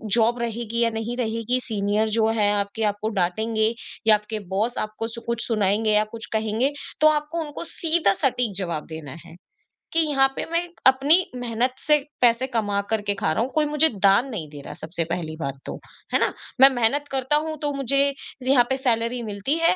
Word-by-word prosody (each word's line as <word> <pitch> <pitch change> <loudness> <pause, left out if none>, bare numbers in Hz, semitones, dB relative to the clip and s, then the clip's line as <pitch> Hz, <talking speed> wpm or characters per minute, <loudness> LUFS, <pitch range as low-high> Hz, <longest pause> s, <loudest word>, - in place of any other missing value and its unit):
Job 235 +1 +2
रहेगी 235 0 -3
या 230 - +3
नहीं 225 +2 -4
रहेगी, 230 +1 -1
सीनियर 215 -2 0
जो 220 -1 +3
हैं 205 -1 +3
आपके 200 +2 -2
आपको 205 +2 -4
डाँटेंगे 220 +5 +1 0.3
या 215 - +8
आपके 210 +1 -4 0.2
बॉस 225 +5 0
आपको 215 +1 -3
सु 235 0 -8
कुछ 235 0 -2
सुनाएँगे 215 -1 +1
या 210 0 +4
कुछ 225 - -7
कहेंगे, 220 +5 +1 0.3
तो 310 - +7
आपको 300 +2 0
उनको 295 +1 -7
सीधा 325 - +3
सटीक 245 -5 +1
जवाब 170 -6 -3
देना 150 -4 -7
है। - - -13 0.6
कि 330 - +3
यहाँ 280 -4 +3
पे - - -3
मैं 335 0 +2 0.3
अपनी 270 +5 +5 0.2
मेहनत 245 +1 -1
से 300 -1 +4 0.2
पैसे 240 +1 +3
कमा 205 -3 0
कर 220 -1 0
के - - +3
खा 160 - 0
रहा 220 - 0
हूँ, 245 - -1
कोई 310 -1 +2
मुझे 300 +2 +2
दान 200 +6 +5
नहीं 200 -11 -5
दे 145 -1 -10
रहा - - -10
है - - -7
सबसे 165 +1 -3
पहली 165 -2 -3
बात 140 -3 -3
तो, - - -5 0.4
है - - +5
ना? - - +1 0.3
मैं 270 - +10
मेहनत 265 +3 +1
करता 265 +1 0
हूँ 315 0 -4
तो 295 -1 -1
मुझे 275 +1 +2 0.3
ज - - -6
यहाँ 260 -2 +5
पे 265 - 0
सैलरी 240 -2 0
मिलती 210 +5 -2
है 330 +2 +4
230 Hz, 205 wpm, -23 LUFS, 210-265 Hz, 0.6 s, मैं